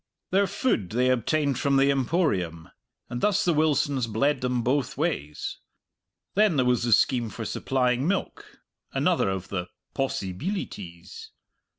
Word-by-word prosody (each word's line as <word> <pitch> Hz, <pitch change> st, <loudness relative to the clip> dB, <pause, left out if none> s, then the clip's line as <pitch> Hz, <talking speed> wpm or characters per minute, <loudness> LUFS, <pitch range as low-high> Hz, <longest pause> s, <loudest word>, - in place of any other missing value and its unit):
Their 195 Hz, +1 st, +3 dB
food 185 Hz, -, 0 dB
they 125 Hz, +3 st, +2 dB
obtained 140 Hz, +2 st, +1 dB
from 140 Hz, -1 st, +2 dB
the 135 Hz, +1 st, +4 dB
Emporium, 115 Hz, -, 0 dB, 0.4 s
and 120 Hz, 0 st, -5 dB
thus 210 Hz, -1 st, +2 dB
the 175 Hz, -, +3 dB
Wilsons 145 Hz, -4 st, +1 dB
bled 135 Hz, +6 st, +1 dB
them 125 Hz, -1 st, 0 dB
both 130 Hz, +2 st, 0 dB
ways. 140 Hz, -, -3 dB, 0.7 s
Then 210 Hz, -4 st, +3 dB
there 130 Hz, -3 st, +2 dB
was 125 Hz, -1 st, +2 dB
the 120 Hz, 0 st, 0 dB
scheme 120 Hz, 0 st, +3 dB
for -, -, -6 dB
supplying 125 Hz, +1 st, 0 dB
milk 195 Hz, +1 st, -3 dB, 0.3 s
another -, -, +2 dB
of 95 Hz, -1 st, -4 dB
the 90 Hz, -2 st, -3 dB, 0.3 s
"possibeelities." 95 Hz, -, -4 dB
130 Hz, 135 wpm, -26 LUFS, 110-150 Hz, 0.7 s, the